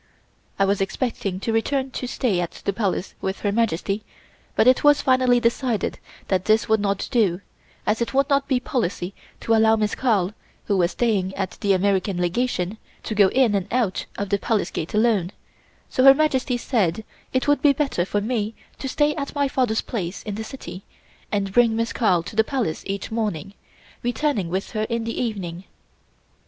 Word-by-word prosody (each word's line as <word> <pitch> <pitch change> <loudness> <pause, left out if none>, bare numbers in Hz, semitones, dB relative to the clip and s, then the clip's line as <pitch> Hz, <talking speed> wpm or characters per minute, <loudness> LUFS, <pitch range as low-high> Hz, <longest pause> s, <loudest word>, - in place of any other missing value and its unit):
I 195 - +3
was 195 0 +1
expecting 195 -2 -2
to 225 - -1
return 265 +4 0
to 250 - -4
stay 230 -7 0
at 175 -1 -5
the 200 - +1
Palace 195 -3 -2
with 190 0 -3
Her 205 - +1
Majesty, 205 -1 0 0.5
but - - +4
it 255 +1 +5
was 290 0 +5
finally 255 -2 +4
decided 235 -1 0 0.3
that 185 -1 0
this 220 0 +3
would 220 0 +3
not 200 -1 -1
do, 200 -8 +2 0.5
as 215 +2 +1
it 235 - -1
would 275 0 +2
not 280 -1 +2
be 260 -2 +2
policy 200 -7 -2 0.3
to 225 - +1
allow 220 0 +5
Miss 215 -1 0
Carl, 210 -7 +1 0.3
who 205 - +1
was 175 -2 +3
staying 200 -4 0
at 190 -2 -2
the 200 -1 +3
American 190 0 +1
Legation, 185 +1 -1 0.2
to - - -3
go 205 -2 +5
in 245 +1 +3
and 195 -1 0
out 230 -6 0
of 200 -1 -3
the 200 0 +1
Palace 215 -4 0
Gate 165 - -4
alone, 210 -5 +2 0.6
so 255 - +1
Her 270 0 +9
Majesty 270 -4 +1
said 220 -6 0 0.3
it 260 +2 0
would 290 0 +3
be 290 - +6
better 275 - 0
for 205 +3 -1
me 220 -1 -2 0.2
to 270 - -4
stay 295 +2 +2
at 280 -1 -5
my 285 -1 +2
father's 250 -5 +1
place 185 -5 -4
in 210 - -4
the 220 +2 -4
city 220 -5 -8 0.5
and 195 -2 -1
bring 235 -1 +4
Miss 230 0 -1
Carl 180 -8 +2
to 210 - -9
the 220 - +5
Palace 235 - -2
each 195 +1 -4
morning, 205 -4 -2 0.5
returning 240 - 0
with 190 +3 -3
her 215 -1 -1
in 230 -1 -1
the 230 0 -3
evening. 190 -6 -4
220 Hz, 190 wpm, -23 LUFS, 195-250 Hz, 0.6 s, Her